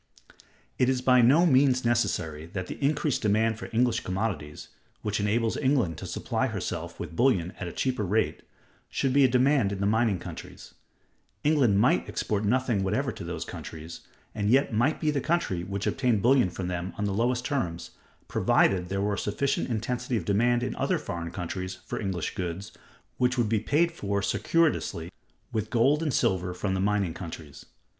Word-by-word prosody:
It 125 - +4
is 130 -1 +1
by 125 0 +5
no 140 +9 +5
means 130 -4 +4
necessary 90 -10 0
that 95 -2 -3
the 115 - -7
increased 145 -1 +1
demand 110 +1 +1
for - - -7
English 115 0 +2
commodities, 95 -6 -4 0.3
which 105 0 -1
enables 110 +2 +1
England 130 - +1
to - - -6
supply - - -1
herself - - -5
with - - -6
bullion 95 -8 +2
at 90 - -4
a - - -5
cheaper 130 +2 -1
rate, 100 -5 0 0.5
should 135 -2 0
be 140 0 +5
a - - +7
demand 130 -3 +3
in 100 - -4
the 100 - 0
mining 110 -1 +2
countries. - - -10 0.7
England 135 -10 +3
might - - +2
export 105 -1 -1
nothing 120 -1 +1
whatever 105 +8 0
to - - -8
those 85 -1 -4
countries, 80 +1 -8 0.3
and 105 -1 -1
yet 135 +1 +3
might 120 +8 +2
be 155 - +1
the 140 -2 -1
country 155 - 0
which 100 +2 -4
obtained 125 -7 +1
bullion 125 -5 +4
from 90 +1 -5
them 90 0 -3
on 105 - -1
the 100 - -1
lowest 120 +3 0
terms, 85 - -2 0.4
provided 90 -2 +2
there 95 +1 -1
were 105 +1 0
a - - -2
sufficient 135 +8 -1
intensity 120 +2 -2
of 90 - -4
demand 120 +5 +2
in 125 - -3
other - - +1
foreign 85 -1 -5
countries 90 +1 -5
for - - -4
English 95 -5 -2
goods, 90 +3 -4 0.5
which 125 +1 +2
would 120 -3 +2
be 110 -1 +2
paid 155 +10 +2
for 100 -10 -2
circuitously, 145 - 0 0.4
with 110 -1 -2
gold 135 +6 +3
and 155 -3 0
silver 95 -8 0
from 95 +1 -2
the 95 - -1
mining 100 -3 +1
countries. 80 -5 -9
110 Hz, 180 wpm, -27 LUFS, 95-125 Hz, 0.7 s, a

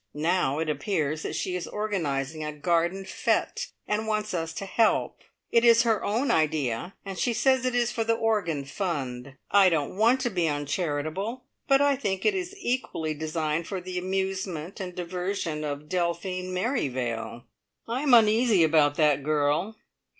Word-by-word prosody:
Now 155 -2 +1
it 160 0 -1
appears 155 -2 -1
that - - -4
she 180 - -2
is 180 - -4
organising 160 -8 -2
a 150 - -3
garden 170 +5 0
fete - - -1 0.2
and 215 +1 -1
wants 215 -1 -1
us 165 -2 -2
to 195 - -5
help. 220 +3 +1 0.3
It 235 - +4
is 230 -1 +6
her 225 -3 +1
own 235 +5 +1
idea, 155 - 0
and 195 -2 -6
she 240 - +1
says 260 +2 +2
it 250 - -1
is 240 -1 +2
for 230 - -1
the 230 0 +2
organ 200 -11 0
fund. 135 -6 -4 0.2
I 195 -2 +6
don't 160 -1 -1
want 230 +6 +4
to 245 - -1
be 175 -4 +1
uncharitable, 155 - -2 0.2
but 275 0 +5
I 285 -1 +4
think 200 -8 -2
it 430 - +4
is 375 0 -4
equally 240 - -2
designed 155 +1 -2
for 195 - -3
the 180 0 -4
amusement 190 -2 -3
and 180 -2 -6
diversion 180 -3 -3
of 145 0 -4
Delphine 180 +1 -2
Merrivale! 130 - -2 0.4
I 240 +3 -2
am 275 -4 +6
uneasy 220 -3 +5
about 150 -2 +4
that 150 -3 +3
girl. 150 +8 0
180 Hz, 165 wpm, -27 LUFS, 155-215 Hz, 0.4 s, is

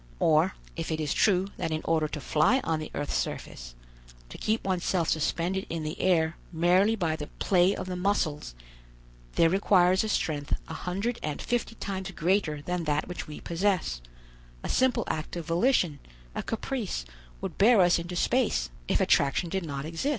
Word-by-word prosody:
Or, 160 +4 +3 0.2
if 165 -1 -4
it 160 - -1
is 150 -2 0
true 195 -1 +3
that - - -2
in 155 0 -2
order 160 -2 +2
to 150 - -5
fly 195 - +3
on 160 -1 0
the 155 - -6
earth's 145 - -3
surface, - - -4 0.5
to - - -9
keep 220 +1 0
oneself 180 -2 0
suspended 175 +4 0
in 165 -1 -3
the 155 0 -4
air 165 -3 +2
merely 180 +6 +3
by 165 -6 0
the 150 -2 -6
play 185 0 +3
of - - -5
the 185 -1 -4
muscles, 180 - -1 0.8
there 165 - +5
requires 185 +1 +4
a 220 - -2
strength 145 -7 -1
a - - -6
hundred 200 +7 -3
and 150 -2 -3
fifty 240 -2 -2
times 190 -3 -4
greater 170 -4 0
than 175 +1 -2
that 150 0 0
which 180 - -6
we 150 - -8
possess, 175 - 0 0.6
a - - -4
simple 260 -1 +2
act 155 +2 -4
of 170 -2 -4
volition, 170 - +2 0.3
a - - -3
caprice, 225 - -3 0.3
would - - -6
bear 220 +2 +6
us 175 -1 +5
into 175 +1 -5
space, 215 - +1 0.2
if - - +2
attraction 140 +5 +2
did 190 -1 -1
not 140 -3 -4
exist." 165 - -2
175 Hz, 180 wpm, -28 LUFS, 155-195 Hz, 0.8 s, bear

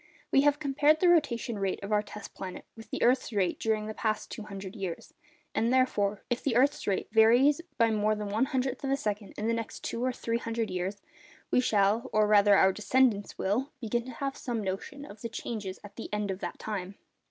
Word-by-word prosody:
We 275 - +5
have 290 0 +3
compared 295 +1 +3
the 360 - +4
rotation 255 -9 +2
rate 195 -1 -1
of 200 - -5
our 210 0 +3
test 210 0 -10
planet 185 -1 -7
with 225 0 -12
the - - -2
earth's 250 0 +3
rate 195 -5 0
during 220 -1 0
the 215 - -5
past 215 -1 -2
200 200 -3 -7
years; 190 -5 -5 0.4
and 230 +2 +1
therefore, 210 -6 +1
if 240 -1 -1
the 265 -5 0
earth's 270 +4 +2
rate 195 -2 0
vary 235 +6 +6 0.2
by 230 -2 +4
more 215 0 +2
than 210 -1 -4
one 220 +6 +2
hundredth 265 -2 -2
of 270 - -1
a 275 - +2
second 210 -4 -4
in 210 - -3
the 230 - +2
next 230 -1 -5
two 230 - -3
or 255 - +1
three 230 -1 -2
hundred 230 -1 -2
years, 185 +2 -3 0.5
we - - +4
shall—or 215 0 +2
rather 205 -1 +6
our 190 0 +5
descendants 215 0 +1
will—begin 240 +2 -1
to 255 - -7
have 275 +3 -3
some 235 -4 -3
notion 195 +9 -5
of 205 -3 -12
the 230 - -4
change 220 -2 -5
at 195 +2 -9
the 230 - -7
end 210 -1 -1
of 190 - -5
that - - -5
time. 195 -3 -5
220 Hz, 210 wpm, -29 LUFS, 205-255 Hz, 0.5 s, vary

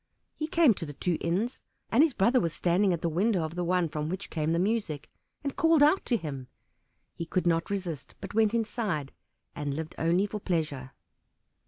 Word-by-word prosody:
He 310 - -3
came 320 -6 +5
to 175 - -6
the 145 - -7
two 175 +1 -1
inns, 195 +9 -1 0.3
and 240 - +5
his 310 -4 +3
brother 235 +7 +4
was 165 -7 -1
standing 185 +3 +2
at 170 -1 -2
the - - +2
window 185 +3 +1
of 160 0 -4
the 175 0 -2
one 180 0 +2
from 150 0 -3
which 190 +3 -5
came 155 -1 0
the 165 - +2
music, 190 -6 -1 0.3
and 280 -1 -3
called 325 -2 +5
out 310 +6 +4
to 240 - +2
him. 140 - -6 0.7
He 170 - -6
could 180 +1 0
not 165 -1 +1
resist, 180 -7 -4
but - - -7
went 220 +1 +3
inside 210 - -1 0.4
and 145 -1 -3
lived 160 +1 -5
only 170 +4 +2
for 210 +1 -5
pleasure. 150 -8 -2
180 Hz, 200 wpm, -29 LUFS, 160-220 Hz, 0.7 s, came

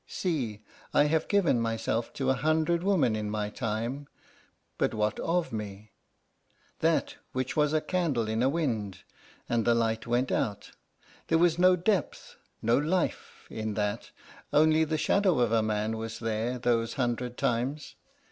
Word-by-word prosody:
See: 125 - -3 0.3
I - - +6
have 155 +1 +1
given 185 - +2
myself 115 0 -1
to 135 -2 0
a - - +4
hundred 155 +5 +1
women 180 - +2
in 105 -1 -3
my 105 0 -2
time 115 +6 -3 0.7
but - - +1
what 105 0 0
of 170 -5 -1
me? 105 -1 -6 0.9
That - - +1 0.2
which 130 0 -2
was 150 -1 +3
a 155 0 +2
candle 150 -12 0
in 110 +1 -1
a 130 - +3
wind, 115 - -2 0.4
and 120 -1 +1
the 120 +1 +3
light 115 -1 0
went 120 +2 +1
out. 100 -2 -2 0.6
There 165 - +3
was 170 0 +3
no 185 0 +6
depth, 185 +2 -2 0.3
no 115 +3 +3
life, 170 +5 -2
in 110 -1 -3
that; 105 -1 -2 0.4
only 155 +1 +4
the 155 0 -1
shadow 190 +1 +2
of 120 -3 +2
a 115 -1 +3
man 110 0 -1
was 115 0 -5
there 115 +2 -2
those 115 -2 0
hundred 125 -1 -2
times. 135 +3 -1
120 Hz, 155 wpm, -28 LUFS, 110-155 Hz, 0.9 s, I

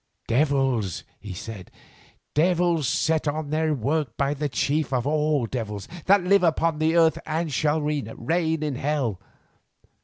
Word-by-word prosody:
"Devils," 130 - +1 0.2
he 105 - -8
said, 95 0 -8 0.6
"devils 170 -2 +2
set 160 -1 +1
on 145 0 -2
their 155 0 +1
work 140 +1 -1
by 140 0 +1
the 150 0 -2
chief 145 +5 0
of 125 -3 0
all 150 -3 +1
devils 110 -4 -5 0.2
that 195 -1 +5
live 195 +2 +4
upon 165 -2 +1
the 160 +1 +2
earth 165 -1 +4
and 160 -1 -2
shall 150 +3 +1
reign 150 +3 -1
in 150 -3 -2
hell. 135 -8 -1
150 Hz, 145 wpm, -25 LUFS, 130-160 Hz, 0.6 s, that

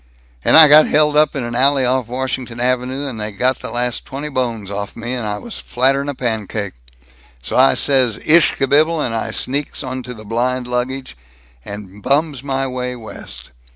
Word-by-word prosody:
"And - - +5
I 160 -1 +10
got 150 +1 +7
held 150 0 +3
up 150 -1 +3
in 135 - -2
an 120 0 -4
alley 135 +2 +3
off 130 -1 0
Washington 125 -1 -4
Avenue, 130 +2 0
and 125 -5 -5
they 105 0 -3
got 125 +6 0
the - - -7
last 120 -1 -2
twenty 140 +3 -6
bones 115 -7 -3
off'n 100 +2 -5
me, 120 +2 -4
and 120 -4 -3
I 105 0 -2
was 235 - -7
flatter 135 +3 +1
'n 140 - -4
a 140 - -4
pancake. 110 -5 -3 0.7
So - - -4
I 130 +1 +5
says 130 -6 +2
'ish 160 0 +5
kabibble,' 150 +4 +2
and 120 -6 -1
I 115 0 -2
sneaks 135 +6 -3
onto 130 -1 -6
the 110 -1 -12
blind 125 +3 -1
baggage, 125 - -3 0.5
and 100 -1 -9
bums 145 +1 +1
my 135 -1 -1
way 125 -1 -4
West. 65 - -8
125 Hz, 190 wpm, -18 LUFS, 115-135 Hz, 0.7 s, I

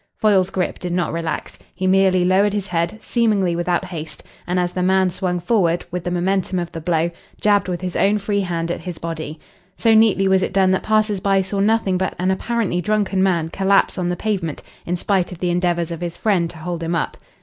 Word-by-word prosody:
Foyle's 195 -4 +3
grip 185 -1 -2
did 180 -1 -4
not 175 -3 0
relax. 165 -2 -4 0.2
He 185 +1 -3
merely 185 -1 +4
lowered 195 +3 +3
his 205 -2 -2
head, 170 +1 -1
seemingly 210 -7 +1
without 175 +1 0
haste, 165 -4 -7 0.2
and, 180 +1 0
as 175 0 -1
the 180 - -2
man 190 0 +3
swung 180 0 -2
forward 175 -3 +1
with 180 0 -3
the - - 0
momentum 185 +1 0
of 175 -1 -3
the 165 - -6
blow, 165 0 0 0.3
jabbed 205 -1 +3
with 180 -1 -3
his 180 -1 -4
own 205 +2 +3
free 205 0 -1
hand 170 -3 -2
at - - -3
his 180 -3 -6
body. 160 -2 -5 0.4
So 225 -1 +3
neatly 220 -3 +4
was 190 0 +3
it 185 - -2
done 190 -1 +3
that 190 - +1
passers 215 -2 +1
by 195 0 +2
saw 195 +1 -3
nothing 200 -3 +2
but 190 - -1
an 185 +2 +1
apparently 200 -2 -1
drunken 205 -1 0
man 170 -4 +1
collapse 195 +1 +2
on 175 -1 -1
the 175 - 0
pavement 190 -8 -2 0.2
in 180 +1 -1
spite 190 0 0
of 180 - -7
the 175 +1 -1
endeavours 175 -1 0
of 170 0 -5
his 175 -1 -4
friend 185 -6 +1
to 170 - -9
hold 170 +1 -5
him 165 +1 -1
up. 165 - -2
185 Hz, 225 wpm, -20 LUFS, 175-195 Hz, 0.4 s, merely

